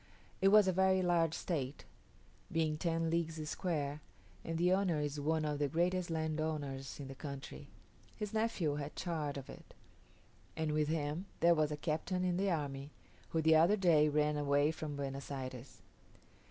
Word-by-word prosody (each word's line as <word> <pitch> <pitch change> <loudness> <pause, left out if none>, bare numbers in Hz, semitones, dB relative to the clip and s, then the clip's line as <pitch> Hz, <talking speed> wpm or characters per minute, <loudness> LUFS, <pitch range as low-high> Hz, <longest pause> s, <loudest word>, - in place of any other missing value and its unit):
It 195 - +5
was 210 0 +7
a 185 - +3
very 190 0 +3
large 170 -2 +2
estate, 140 - -3 0.7
being 160 -2 +1
ten 165 0 0
leagues 165 -2 -1
square, 150 -4 -2 0.4
and 165 0 -3
the 180 +2 +3
owner 185 -5 +2
is 145 0 -2
one 155 +2 0
of 150 -1 -1
the 145 - +2
greatest 175 +4 0
landowners 155 -4 -3
in 140 - -6
the 135 - -7
country. 140 0 -8 0.5
His 210 -1 -5
nephew 210 -10 0
had 145 0 -5
charge 155 -5 -2
of 135 - -7
it, - - -13 0.8
and 160 -1 0
with 150 0 +1
him 155 +4 -2
there 170 +1 +6
was 155 -2 +1
a 150 - -2
captain 165 +4 -1
in 180 -1 +1
the 195 +1 +1
army, 140 -4 -2 0.4
who 160 -1 0
the 160 0 +6
other 170 +7 +5
day 160 -6 +4
ran 150 0 +1
away 145 +1 +2
from 155 -2 -5
Buenos 140 -1 -5
Ayres. 130 -2 -7
155 Hz, 170 wpm, -35 LUFS, 145-170 Hz, 0.8 s, was